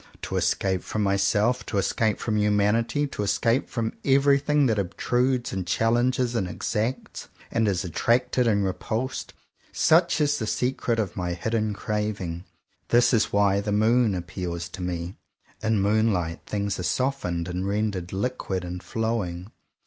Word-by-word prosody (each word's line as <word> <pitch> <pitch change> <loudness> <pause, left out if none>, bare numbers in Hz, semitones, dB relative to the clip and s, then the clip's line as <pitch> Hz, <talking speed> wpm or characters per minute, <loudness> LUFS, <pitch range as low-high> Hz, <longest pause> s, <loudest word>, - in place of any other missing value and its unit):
To - - -4
escape 95 -2 +1
from 110 - -2
myself, 100 +5 +2
to 100 - -2
es 100 - +1
cape 110 -3 +1
from 110 - -2
humanity, 105 +6 +2
to 135 - -5
escape 115 +5 +1
from 115 -2 -2
every 140 +1 +4
thing 150 0 +2
that 110 -4 +2
obtrudes 120 +6 0
and 95 -2 -3
challenges 120 +5 +1
and 105 -6 0
ex 90 - -4
acts, 115 +5 -2 0.2
and 115 -1 +1
is 95 -3 0
attracted 120 +7 +1
and 100 -3 +2
repulsed, 110 +7 -3 0.2
— - - -33 0.2
such 170 +1 +5
is 145 -1 +2
the 110 - -3
secret 120 +1 0
of 105 -5 -2
my 90 -1 -2
hidden 110 +3 -1
craving. 100 -5 -3 0.4
This 120 +1 +4
is 115 -2 +2
why 100 -1 +3
the 105 - -3
moon 110 +1 +3
appeals 85 0 -4
to 90 - -8
me. 90 0 -4 0.4
In 110 -1 +1
moonlight, 100 -5 +1
things 100 -2 -2
are - - -2
softened, 90 -8 -1
and 90 +2 -3
rendered 100 -3 -1
liquid 95 -3 -2
and 90 0 -5
flowing. 105 -5 -3
105 Hz, 160 wpm, -25 LUFS, 95-120 Hz, 0.4 s, such